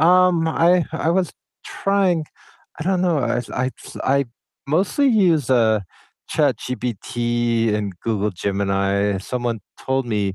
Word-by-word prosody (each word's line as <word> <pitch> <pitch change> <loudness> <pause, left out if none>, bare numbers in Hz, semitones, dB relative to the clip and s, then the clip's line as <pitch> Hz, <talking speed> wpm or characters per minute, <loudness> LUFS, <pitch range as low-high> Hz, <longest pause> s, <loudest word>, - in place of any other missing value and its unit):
um, 175 -1 +4
I 170 +2 +3
I 160 0 0
was 180 0 +1 0.3
trying 195 -5 +1 0.6
I 155 - -3
don't 185 -1 +1
know, 175 -4 +2
I 125 - 0 0.2
I - - +1 0.2
s - - -11
I 140 +1 +3 0.4
mostly 185 - +2
use, 175 - +3
uh, 110 -4 +4 0.5
ChatGPT 120 -3 0
and 105 -2 -2
Google 105 -2 0
Gemini, 100 +1 0
someone 120 +2 -3 0.2
told 130 -1 -1
me 100 -4 -1
130 Hz, 130 wpm, -21 LUFS, 105-170 Hz, 0.6 s, um